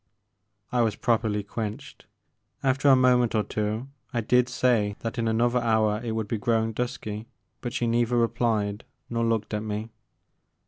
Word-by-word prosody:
I 125 - +2
was 110 -2 +1
properly 110 -3 +1
quenched. 105 +1 -6 0.6
After 135 +1 +3
a 135 - +8
moment 125 -2 +3
or 105 - +3
two 105 +4 -2 0.2
I 120 - 0
did 125 +2 +3
say 115 -5 +2
that 115 +2 -3
in 115 - 0
another 120 +2 +2
hour 110 -2 +2
it 115 -2 -2
would 110 -1 -2
be 110 +1 -2
growing 115 -1 +1
dusky, 110 -2 -4 0.3
but 120 - -3
she 120 - -1
neither 120 +1 +2
replied 115 -3 0 0.3
nor 115 0 0
looked 115 -2 0
at 105 - -1
me. 110 +1 -4
115 Hz, 165 wpm, -26 LUFS, 110-120 Hz, 0.6 s, a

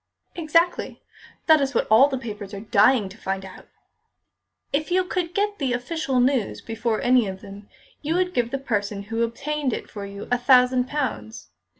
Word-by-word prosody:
"Exactly. 335 +1 0 0.5
That 315 -2 +5
is 275 0 -1
what - - +2
all 240 +6 +7
the 270 -2 -3
papers 210 -5 -7
are - - -6
dying 215 +1 +3
to 195 +4 -13
find 195 0 -3
out." 190 - -13 1.1
"If 300 +4 -1
you 370 +1 +2
could 360 -1 -3
get 410 0 0
the 265 -4 0
official 265 +1 -1
news 250 -4 +1
before 225 -1 -2
any 245 -3 +3
of 190 0 -6
them, 200 0 -12 0.3
you 310 +3 -1
would 360 0 0
give 240 -1 0
the 275 - -2
person 205 -6 -3
who 225 +3 -3
obtained 270 +3 -2
it - - -6
for 200 -2 -7
you 200 +1 -9
a 245 - +2
thousand 250 0 +4
pounds. 250 - -4
250 Hz, 185 wpm, -23 LUFS, 210-295 Hz, 1.1 s, all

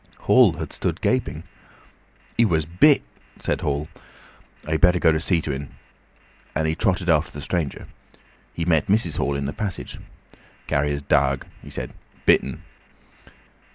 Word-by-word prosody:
Hall - - +5
had - - -6
stood - - -2
gaping. 80 - -1 0.9
"He 115 - +4
wuz 85 -8 +2
bit," 90 - +4 0.4
said - - -2
Hall. 70 +1 -1 0.8
"I'd 80 -2 -1
better 90 +1 +5
go 85 - +4
and 80 0 0
see 85 -1 +2
to 75 - -3
en," 70 0 -7 0.8
and 80 - +1
he 80 - +1
trotted 95 0 0
after 80 0 +3
the 75 - -8
stranger. 80 0 -3 0.7
He 85 - -2
met 80 -3 +2
Mrs. 95 -6 +2
Hall 70 - 0
in 70 0 -2
the 70 - -3
passage. 105 -4 -5 0.7
"Carrier's 70 0 0
darg," 70 -2 +2 0.2
he - - -11
said - - -6 0.3
"bit - - +5
en." - - -7
80 Hz, 155 wpm, -23 LUFS, 70-90 Hz, 0.9 s, Hall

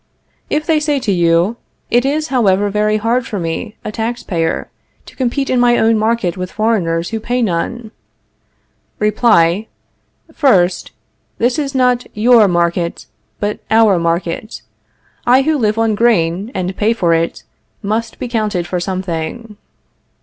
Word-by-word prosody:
If 305 +1 -1
they 315 -1 +2
say 300 -2 0
to 240 -6 -1
you: 175 +4 +2 0.3
It 245 +2 +3
is, 305 +3 -1
however, 205 -5 +2
very 210 +1 +1
hard 230 +3 0
for 210 - -4
me, 175 +6 -4
a - - -3
tax 230 +2 -3
payer, 165 -3 -2 0.3
to - - -15
compete 265 +2 -1
in 255 - +1
my 240 0 +4
own 225 0 +3
market 220 -4 0
with 185 0 -5
foreigners 180 -7 0
who 225 - -2
pay 240 +2 -1
none 220 +4 -2 1.1
Reply: 210 -3 +2 0.7
First, 190 - +2 0.5
This 245 +4 +1
is 275 -2 -3
not 250 -1 +2
your 225 0 +5
market, 170 -1 -1 0.3
but 210 0 -2
our 220 -4 +4
market. 170 +5 -3 0.6
I 255 +2 +5
who 310 +2 +1
live 215 -5 0
on 225 -1 +2
grain, 200 -3 +1
and 185 +1 -2
pay 215 +3 +1
for 175 -7 +1
it, 165 0 -1 0.4
must 220 +2 -2
be - - -4
counted 215 -7 -1
for 180 +1 -2
something. 185 +4 -4
215 Hz, 150 wpm, -16 LUFS, 180-240 Hz, 1.1 s, your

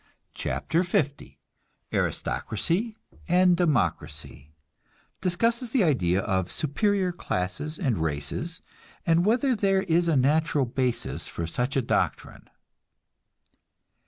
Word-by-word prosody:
CHAPTER 75 - -1
L 145 -8 +2 0.7
ARISTOCRACY 200 - -1 0.3
AND 180 0 +5
DEMOCRACY 105 - -1 0.7
(Discusses 230 +7 0
the 230 -2 +2
idea 100 - +2
of 95 -3 -1
superior 185 +5 +1
classes 120 - -3
and 130 - 0
races, 80 - -3 0.4
and 170 +1 +3
whether 250 +3 +3
there 195 -2 +2
is 170 -2 +2
a 160 -4 +3
natural 150 +1 +2
basis 125 0 -2
for 85 - -4
such 125 - -1
a 135 - +2
doctrine.) - - -2
160 Hz, 100 wpm, -26 LUFS, 115-185 Hz, 0.7 s, AND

